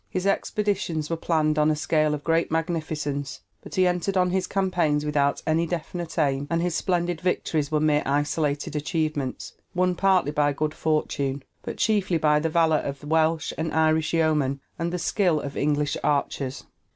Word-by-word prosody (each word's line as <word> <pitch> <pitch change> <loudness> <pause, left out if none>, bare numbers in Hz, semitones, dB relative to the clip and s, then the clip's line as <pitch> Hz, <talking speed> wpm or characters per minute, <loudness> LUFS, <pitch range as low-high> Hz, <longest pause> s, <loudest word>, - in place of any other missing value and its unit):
His 185 +1 -3
expeditions 195 -6 -1
were - - +1
planned 155 -2 +1
on 150 0 +4
a 155 - +2
scale 155 0 +1
of 145 - -8
great 165 0 +1
magnificence, 155 -4 -2 0.2
but - - -9
he 185 - +4
entered 180 +2 0
on 180 -1 +3
his 185 0 0
campaigns 175 -6 +1
without 145 -1 +1
any 165 +2 +1
definite 170 0 -5
aim, 140 -2 +1
and 165 - +1
his 175 0 0
splendid 175 -1 -1
victories 160 -5 -1
were 155 - +2
mere 150 -1 +3
isolated 145 +1 -1
achievements, 150 -3 -2 0.2
won 180 0 +2
partly 185 -4 +2
by 145 -1 +2
good 155 +2 -2
fortune, 140 -4 -1 0.2
but - - -6
chiefly 200 -5 +2
by 150 -1 +3
the 160 +2 -1
valor 160 -1 +3
of 140 0 -5
Welsh 160 +1 +1
and 160 0 -1
Irish 160 0 +2
yeomen 150 -4 +1 0.2
and 170 +1 -1
the 180 - -2
skill 175 -2 +1
of 140 -1 -6
English 145 0 0
archers. 140 -2 -1
155 Hz, 175 wpm, -25 LUFS, 150-175 Hz, 0.2 s, on